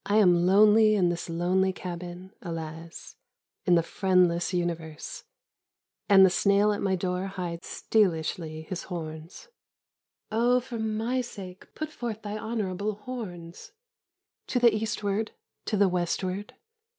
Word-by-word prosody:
am 180 Hz, -4 st, +5 dB
lonely 215 Hz, +2 st, +6 dB
in 180 Hz, -4 st, +3 dB
this 175 Hz, 0 st, -3 dB
lonely 180 Hz, +3 st, +1 dB
cabin, 180 Hz, +1 st, -7 dB
alas, 165 Hz, -1 st, -7 dB, 0.5 s
in 180 Hz, -, +6 dB
the 170 Hz, -, +3 dB
friendless 180 Hz, -2 st, +2 dB
Universe, 170 Hz, -3 st, -4 dB, 0.8 s
and 195 Hz, -1 st, +8 dB
the -, -, +5 dB
snail 200 Hz, +3 st, +3 dB
at 205 Hz, -, -2 dB
my 190 Hz, -1 st, +1 dB
door 180 Hz, +1 st, -2 dB
hides 175 Hz, -3 st, -5 dB
stealishly 160 Hz, -5 st, 0 dB
his 175 Hz, +2 st, -6 dB
horns. 160 Hz, -2 st, -7 dB, 0.4 s
" -, -, -56 dB
Oh^for 240 Hz, +1 st, +1 dB
my 225 Hz, +4 st, 0 dB
sake, 190 Hz, -6 st, -10 dB
put 310 Hz, 0 st, -4 dB
forth 230 Hz, -5 st, -5 dB
thy 205 Hz, 0 st, -4 dB
honourable 215 Hz, -2 st, -2 dB
horns 200 Hz, -7 st, -8 dB, 0.4 s
/ 360 Hz, +1 st, -62 dB
" 400 Hz, -, -59 dB
To -, -, -1 dB
the 240 Hz, -1 st, +6 dB
Eastward, 215 Hz, -1 st, -2 dB, 0.3 s
to 210 Hz, -, 0 dB
the 200 Hz, 0 st, +5 dB
Westward 185 Hz, +2 st, -2 dB
190 Hz, 135 wpm, -27 LUFS, 175-215 Hz, 0.8 s, and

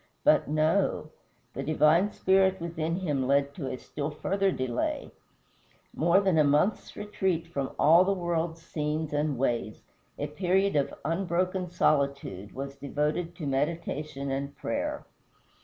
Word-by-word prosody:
But -, -, +4 dB
no. 155 Hz, +1 st, +1 dB, 0.4 s
The -, -, -4 dB
divine 155 Hz, +7 st, +3 dB
Spirit 190 Hz, 0 st, +3 dB
within 165 Hz, -1 st, -2 dB
him 140 Hz, -7 st, 0 dB
led 140 Hz, +1 st, +2 dB
to 140 Hz, -5 st, -5 dB
a 130 Hz, -, -4 dB
still 145 Hz, +3 st, -5 dB
farther 195 Hz, +6 st, 0 dB
delay. 130 Hz, -7 st, -2 dB, 0.8 s
More 170 Hz, +4 st, +4 dB
than 190 Hz, -5 st, +2 dB
a -, -, +6 dB
month's 150 Hz, +9 st, +1 dB
retreat 190 Hz, -5 st, -1 dB
from 140 Hz, -5 st, -4 dB
all 165 Hz, +4 st, +6 dB
the 195 Hz, -, +1 dB
world's 170 Hz, -3 st, -2 dB
scenes 150 Hz, 0 st, -3 dB
and 145 Hz, -2 st, 0 dB
ways, 120 Hz, -4 st, -1 dB, 0.3 s
a 145 Hz, -, -2 dB
period 185 Hz, +5 st, +1 dB
of 140 Hz, -2 st, +1 dB
unbroken 180 Hz, +2 st, -1 dB
solitude, 140 Hz, -, 0 dB
was 140 Hz, +1 st, -5 dB
devoted 150 Hz, +5 st, -2 dB
to 155 Hz, -, -6 dB
meditation 145 Hz, 0 st, -2 dB
and 140 Hz, +1 st, -3 dB
prayer. -, -, -3 dB
155 Hz, 140 wpm, -28 LUFS, 140-175 Hz, 0.8 s, a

